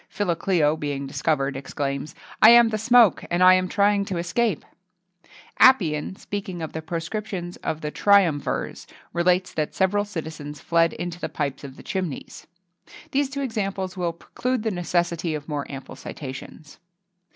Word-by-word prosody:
Philocleo, 170 -5 +1
being 145 -3 -3
discovered, 140 0 -1
exclaims, 140 +1 -4 0.3
"I 220 - +10
am 235 -1 +8
the 215 -1 -2
smoke, 235 -2 +5
and 175 +1 +2
I 185 0 +9
am 185 0 +2
trying 200 +1 +2
to 190 -3 -3
escape."[XXII 185 +3 -1 0.6
56] - - -22 0.2
Appian, 180 - +4
speaking 190 -4 -5
of 160 - -6
the 160 - -4
proscriptions 175 +2 -5
of 160 0 -4
the 150 - -3
triumvirs, 185 -8 +2 0.3
relates 180 +1 +1
that 155 -1 -2
several 200 +2 +2
citizens 155 -7 -7
fled 165 +1 +2
into 175 -1 -5
the - - -4
pipes 145 -3 -3
of 135 -1 -9
the - - -12
chimneys.[XXII 185 -7 -5 0.4
57] - - -17
These 280 -1 +1
two 280 +1 -4
examples 195 -7 -3
will 175 -2 -2
preclude 250 +7 -3
the 220 - 0
necessity 175 -2 -1
of 150 -1 -7
more 145 -3 -3
ample 135 -1 -8
citations. 140 +2 -9
175 Hz, 160 wpm, -24 LUFS, 150-200 Hz, 0.6 s, I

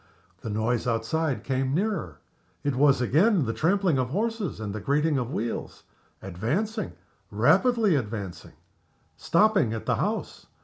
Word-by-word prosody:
The 115 - -6
noise 110 +3 -1
outside 130 +6 -1
came 135 0 -1
nearer. 185 - -2 0.5
It 145 -2 0
was 140 -1 +4
again 165 - +3
the 115 - -2
trampling 180 - +1
of 125 -1 -1
horses 215 - -2
and 105 -2 -4
the 110 - -4
grating 145 +4 +1
of 120 -2 -3
wheels. 115 -3 -4 0.4
Advancing 160 - -2 0.4
rapidly 195 - +3
advancing 105 -8 -5 0.6
stopping 195 - +2
at 110 - -5
the - - +1
house. - - -3
140 Hz, 135 wpm, -26 LUFS, 115-190 Hz, 0.6 s, was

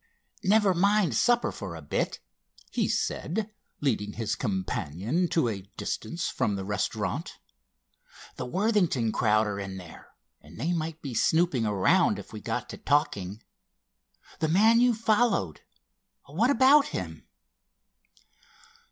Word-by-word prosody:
"Never 205 0 +4
mind 195 - +2
supper 240 - +3
for 95 -5 -7
a 80 - -8
bit," 70 - -2 0.5
he - - 0
said, 210 +6 -2 0.3
leading 105 -7 -1
his 110 -1 -2
companion 105 - -2
to 165 -6 +1
a 105 -4 -3 0.2
distance 170 +11 -3
from 105 - -1
the 95 -1 -4
restaurant. 100 -1 -3 1.0
"The - - -5
Worthington 180 - +1
crowd 110 0 +2
are 100 -1 -3
in 95 -1 -5
there 90 -3 -12 0.3
and 75 +6 -14
they 165 +8 0
might 165 -1 -4
be 135 -4 -5
snooping 140 -2 +2
around 100 -3 +3
if - - -10
we - - -7
got - - -3
to - - -7
talking. 115 - 0 1.0
The 160 - +1
man 220 +7 +5
you 245 -1 +4
followed—what 215 - -1
about 280 +2 +6
him?" 80 -4 -6
140 Hz, 125 wpm, -27 LUFS, -, 1.0 s, about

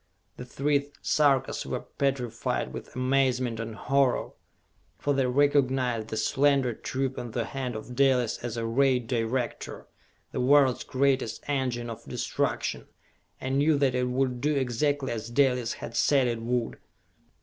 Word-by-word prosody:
The 125 - -7
three 140 +2 0
Sarkas 140 -3 +2
were - - -3
petrified 130 -4 -2
with - - -9
amazement 130 -2 +1
and 115 -1 -5
horror, 135 +2 +1 0.7
for 145 - 0
they 135 -2 +1
recognized 130 -4 +2
the 110 - -4
slender 135 +2 +2
tube 130 +3 -3
in 120 - -5
the 115 0 -2
hand 130 -3 -4
of 120 +3 -7
Dalis 130 -4 +2
as 120 -1 -5
a 115 - -2
Ray 130 +3 +3
Director, 120 0 -3 0.5
the - - -2
world's 135 -1 +4
greatest 130 -3 0
engine 130 -4 -1
of 115 -1 -7
destruction, - - -2 0.5
and 130 +1 -1
knew 150 +1 +4
that 135 -2 +2
it 125 0 0
would 125 -1 0
do 150 +2 +1
exactly 135 +2 0
as 115 0 -4
Dalis 125 -2 +2
had 115 - -8
said 135 0 +3
it 115 -1 -2
would. 120 0 -2
130 Hz, 150 wpm, -27 LUFS, 120-140 Hz, 0.7 s, world's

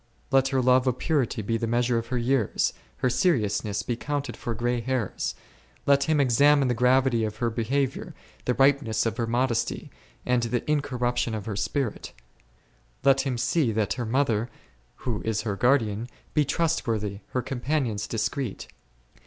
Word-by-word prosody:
Let 135 -1 +4
her 135 -1 +1
love 130 +1 +4
of 125 -1 +1
purity 130 -8 0
be 115 +3 0
the 115 - -2
measure 120 0 +1
of 115 - -7
her 125 +1 -2
years, 120 -2 +1 0.2
her 130 - +1
seriousness 110 - +1
be 120 - -2
counted 140 0 -3
for 115 - -4
grey 120 +1 0
hairs; 125 -4 -2 0.5
let 140 0 +4
him 155 -2 +2
examine 140 +2 +4
the - - +2
gravity 125 0 +3
of 105 -1 -2
her 120 -2 0
be 115 +1 -2
haviour, 135 +2 -1 0.3
the 125 - +1
ripeness 135 -3 +3
of 115 - -1
her 115 - -1
modesty, 120 0 -1 0.3
and 125 -1 +2
the 120 +1 -1
incor 145 -3 -1
ruption 120 -2 0
of 105 -2 -5
her 110 -3 -3
spirit; 125 +3 -2 0.9
let 135 -1 +5
him 130 -3 -2
see 125 +2 +1
that 105 -2 0
her 120 -2 -4
mother, 120 -2 +1 0.6
who 115 -5 -1
is 110 -1 -1
her 105 -3 -2
guardian, 115 -2 +2 0.3
be 150 -2 +3
trustworthy, 115 - -1
her 125 - -2
companions 125 -5 -1
discreet. 115 +1 -3
125 Hz, 170 wpm, -26 LUFS, 115-135 Hz, 0.9 s, let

